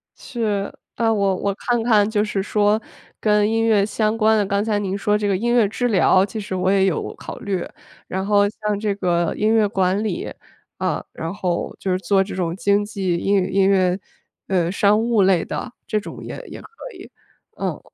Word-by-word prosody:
是， 210 -5 -3 0.2
啊， 225 -1 +1
我 200 -3 +1
我 200 +2 -1
看 240 +2 -1
看 215 -3 +4
就 210 -1 +1
是 210 -2 -2
说 210 +2 +1 0.4
跟 210 -1 +3
音 225 0 +1
乐 215 -3 +3
相 215 +1 0
关 220 0 +4
的， 205 - +2
刚 200 +1 0
才 210 -1 0
您 195 -1 -2
说 210 +1 +1
这 210 -1 -1
个 200 - +2
音 240 +4 0
乐 235 -4 +4
治 245 +4 -1
疗， 190 -2 +4
其 220 +2 -6
实 195 -2 -5
我 185 +1 +1
也 195 -1 +3
有 185 -5 -1
考 - - -8
虑。 190 -3 -2 0.4
然 190 +1 -3
后 205 0 +4
像 210 -1 -3
这 205 -1 -1
个 175 -3 0
音 215 +1 +2
乐 220 -2 +4
管 195 0 0
理， 205 -6 -3 0.5
呃， - - -1
然 165 +1 -4
后 180 -4 -2
就 190 - -2
是 180 - +2
做 195 +1 +2
这 195 - -7
种 175 -2 -2
经 200 +2 +2
济 190 -5 -2
英 200 +4 +1
语 190 -2 +1
音 195 -1 +3
乐， 185 -1 +2 0.5
呃， 175 -3 +1
商 205 +2 +3
务 230 -2 +2
类 185 -3 +3
的， 250 - -5
这 215 - 0
种 210 - -9
也 - - -6
也 - - -9
可 - - -13 0.3
以， 370 - -12 0.5
嗯， - - -2
205 Hz, 225 characters per minute, -21 LUFS, 190-215 Hz, 0.5 s, 看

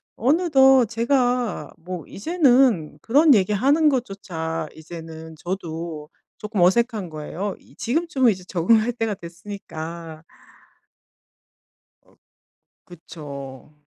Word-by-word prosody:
어느덧 270 -2 +4
제가 245 0 0
뭐 180 -1 -7
이제는 250 - +2
그런 285 +2 +5
얘기하는 255 - +3
것조차 180 - -3
이제는 160 0 -10
저도 165 -4 -5 0.3
쪼끔 210 -3 -2
어색한 210 0 +2
거예요. 165 +6 -5
이 - - -22
지금쯤은 265 -2 +1
이제 185 -2 -6
적응할 215 +7 +3
때가 225 -3 -1
됐으니까. 170 -3 -8 1.8
어 - - -27 0.7
그쵸. 150 -5 -10
195 Hz, 215 characters per minute, -23 LUFS, 165-245 Hz, 1.8 s, 그런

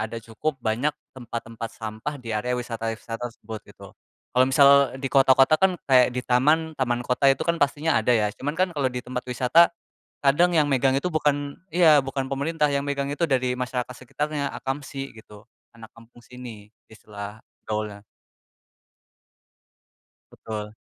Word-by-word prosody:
ada 110 +2 -4
cukup 115 +7 -4
banyak 120 +7 0 0.2
tempat-tempat 115 -2 -6
sampah 110 +6 -5
di 115 -2 -6
area 125 +4 -1
wisata-wisata 115 0 -4
tersebut, 110 -1 -9
gitu. - - -14 0.4
Kalau 125 +1 +5
misal 140 +1 +6 0.3
di 135 0 -4
kota-kota 135 +2 +5
kan, 190 -2 +3
kayak 125 -2 +6
di - - +1
taman, 155 +6 +2
taman 120 -1 0
kota 130 +3 +2
itu 135 - +2
kan 170 0 0
pastinya 145 +2 +2
ada 125 - +2
ya, 105 -1 0
cuman 145 +8 -5
kan 185 +1 +2
kalau 140 -5 0
di 125 0 -5
tempat 125 0 -5
wisata, 130 +7 +4 0.6
kadang 170 +6 +4
yang 150 -2 +4
megang 135 0 +2
itu 160 - -4
bukan 145 -2 0 0.2
iya. 160 -4 +6
Bukan 135 0 -3
pemerintah 150 +3 0
yang 140 0 0
megang 140 -1 -1
itu 145 - -5
dari 130 -2 +1
masyarakat 125 0 -3
sekitarnya, 145 +3 -3
akamsi 135 0 -5
gitu 105 -1 -14 0.3
anak 110 -1 -13
kampung 115 +1 -18
sini, 120 -5 -11 0.2
istilah 105 -1 -9 0.3
gaulnya. 105 -1 -4 2.3
Betul. 105 -1 -7
130 Hz, 150 wpm, -24 LUFS, 115-145 Hz, 2.3 s, misal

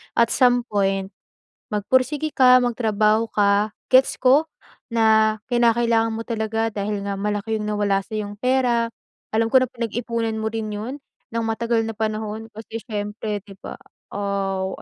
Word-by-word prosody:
At 235 -1 +3
some 245 -2 +3
point 195 -1 0 0.6
magpursige 260 +8 +1
ka, 255 -1 +7
magtrabaho 220 -2 +1
ka 205 +1 +2 0.2
gets 260 +1 +5
ko 270 +5 +4 0.5
na 220 -1 +4
kinakailangan 230 -1 +2
mo 225 - -4
talaga 225 -1 -1
dahil 205 0 -3
nga 200 0 -3
malaki 210 +2 -1
yung 210 - -4
nawala 205 -2 +1
sa 220 - -12
'yong 205 -1 -5
pera, 250 -2 +2 0.5
alam 225 +1 +2
ko 260 - +7
na 255 - 0
pinag-ipunan 230 -1 -3
mo 220 - -2
rin 220 -1 -3
yon 215 +6 -5 0.4
ng 230 0 -1
matagal 225 +1 0
na 225 - -3
panahon 215 0 -3
kasi 225 +1 -7
syempre 210 -1 -4
di 205 - -15
ba? - - -8 0.4
Aw, 195 -1 -2
220 Hz, 150 wpm, -22 LUFS, 210-235 Hz, 0.6 s, ka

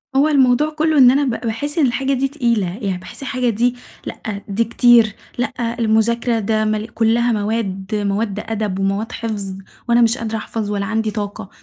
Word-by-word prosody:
هو 285 +3 +4
الموضوع 275 0 +3
كُلّه 310 0 0
إن 250 -2 +8
أنا 285 +2 +2
ب 265 - 0 0.2
باحِسّ 290 +8 -3
إن 300 - +4
الحاجة 265 +2 0
دي 270 +1 +1
تقيلة، 235 -9 0
يعني 195 -3 -1
باحِسّ 185 - -10
الحاجة 255 -2 -1
دي 240 +3 +1 0.3
لأ، 200 -2 -6
دي 205 +3 +1
كتير، 230 -2 +4 0.2
لأ، 240 -1 -2
المُذاكرة 225 +1 +2
ده 215 +1 0
م 215 0 -1
كُلّها 230 +2 +1
مواد 205 -2 -2
مواد 205 0 -1
أدب 215 -4 -3
ومواد 195 +4 -1
حفظ، 205 -4 -4 0.3
وأنا 235 0 +5
مش 230 +2 +3
قادرة 220 -1 -3
أحفظ 215 -1 -4
ولا 200 -1 -1
عندي 220 0 -1
طاقة، 205 -2 -5
225 Hz, 180 wpm, -19 LUFS, 210-245 Hz, 0.3 s, إن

